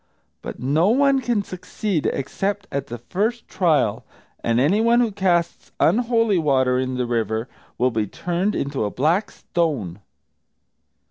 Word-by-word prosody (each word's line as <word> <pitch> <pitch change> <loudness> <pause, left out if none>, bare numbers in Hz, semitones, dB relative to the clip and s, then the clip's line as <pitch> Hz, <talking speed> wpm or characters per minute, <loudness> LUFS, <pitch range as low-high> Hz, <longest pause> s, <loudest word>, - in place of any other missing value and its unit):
But - - -7
no 150 - +2
one 275 +2 +3
can 235 -5 0
succeed 185 -2 -3
except 200 +9 -2
at 140 -1 -3
the 120 - -6
first 210 - -2
trial, 160 - +1 0.4
and 115 0 +2
anyone 220 - +3
who 235 -3 +2
casts 180 -4 0
unholy 230 -4 +3
water 130 -4 +2
in 130 0 -2
the 125 - 0
river 115 -1 -1 0.3
will 125 +1 +2
be 110 -2 -1
turned 180 - -2
into 140 -4 -2
a 105 - -1
black 160 - +1
stone." 130 - -2
170 Hz, 140 wpm, -22 LUFS, 125-205 Hz, 0.4 s, one